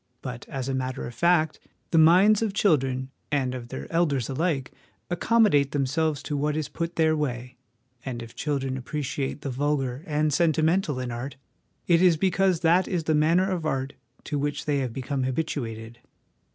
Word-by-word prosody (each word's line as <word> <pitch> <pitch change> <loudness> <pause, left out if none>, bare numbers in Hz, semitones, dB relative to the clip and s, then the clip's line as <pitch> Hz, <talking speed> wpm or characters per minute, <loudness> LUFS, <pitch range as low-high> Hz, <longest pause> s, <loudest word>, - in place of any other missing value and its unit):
' 125 - -45
But, 125 -2 -7
as 135 -1 -4
a 135 - -1
matter 130 -1 -3
of 120 - -7
fact, 160 +3 +2 0.3
the 165 - +4
minds 185 +7 +6
of 210 -3 -1
children 135 -9 +1 0.2
and 135 -3 0
of 125 -2 -6
their - - -6
elders 150 -8 +1
alike 140 -1 -1 0.4
accommodate 175 -7 +3
them 140 -2 +1
selves 155 +1 -1
to 150 - -3
what 150 +1 0
is 155 -3 -3
put 165 0 -3
in 175 - -32
their 160 -1 +3
way; 125 -4 -3 0.5
and 120 -3 -5
if 115 - -12
children 135 -2 -2
appreciate 140 +1 -4
the 140 - -4
vulgar 135 0 -1
and 150 -1 +1
sentimental 160 -1 +2
in 125 -1 -3
art, 120 +4 -5 0.5
it 170 -1 +4
is 180 -3 +5
because 185 0 +2
that 175 +2 +3
is 175 -3 -1
the 155 - +1
manner 165 +5 +3
of 175 -3 -2
art 135 -3 -2 0.3
to 145 -1 -3
which 145 +1 -2
they 140 -3 0
become 135 +3 -3
habituated. 120 -5 -3
145 Hz, 180 wpm, -26 LUFS, 130-165 Hz, 0.5 s, minds